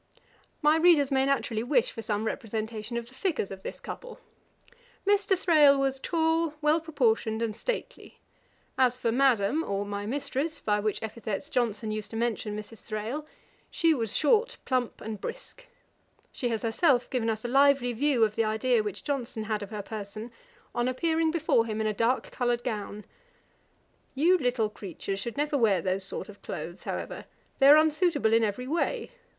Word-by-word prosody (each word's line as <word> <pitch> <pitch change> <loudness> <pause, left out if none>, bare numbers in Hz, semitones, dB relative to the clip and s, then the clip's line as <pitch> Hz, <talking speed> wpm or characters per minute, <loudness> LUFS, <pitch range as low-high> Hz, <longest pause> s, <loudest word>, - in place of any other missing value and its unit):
My 300 +2 +5
readers 320 -5 +5
may 265 0 +2
naturally 250 -5 0
wish 245 0 +2
for 225 - -7
some 215 -2 -2
representation 220 -1 -4
of 235 0 -4
the 255 - -16
figures 295 - -2
of 190 -1 -8
this - - -7
couple. - - -8 0.9
Mr. 400 -1 +3
Thrale 305 -6 +5
was 270 -1 0
tall, 325 0 +1
well 305 +1 +3
proportioned, 230 -8 0
and 220 -2 -2
stately. - - -5 0.6
As 250 -1 +4
for 235 -2 0
Madam, 255 +2 +3
or 200 -4 -2
my 205 0 -4
Mistress, 285 +4 -2
by 210 -1 +1
which 215 +1 -2
epithets 220 +5 -5
Johnson 220 -3 0
used 215 -1 -4
to 225 - -6
mention 225 -2 -2
Mrs. 215 +1 -9
Thrale, 230 +8 -4 0.4
she 330 -1 +3
was 225 -7 -2
short, 450 +11 +3
plump, 255 -3 -1
and 215 -2 -6
brisk. - - -7 0.6
She 245 - -2
has 225 0 -2
herself 245 +2 +2
given 235 -3 0
us 220 +1 -3
a - - 0
lively 270 -1 +4
view 260 0 +2
of 215 -1 +1
the 225 - +2
idea 220 +2 +2
which 210 -3 -5
Johnson 245 -6 -3
had 215 -1 -2
of 205 - -6
her 210 -2 -5
person, 215 +2 -7 0.4
on 240 +1 0
her - - +1
appearing 320 +4 +1
before 315 -8 +2
him 215 -1 -3
in 220 - 0
a 215 - +1
dark 230 +5 0
coloured 240 -1 0
gown; 210 -3 -4 1.1
'You 345 +7 +4
little 245 -5 0
creatures 195 0 -5
should 235 +4 -5
never 295 0 0
wear 210 -6 +4
those 185 +2 -1
sort 190 - -5
of 205 -1 -13
clothes, 170 +3 -7
however; - - -5 0.3
they 270 - +6
are 290 +2 +10
unsuitable 310 -6 +2
in 225 0 +5
every 220 +4 -1
way. 345 - -1
240 Hz, 180 wpm, -28 LUFS, 215-295 Hz, 1.1 s, are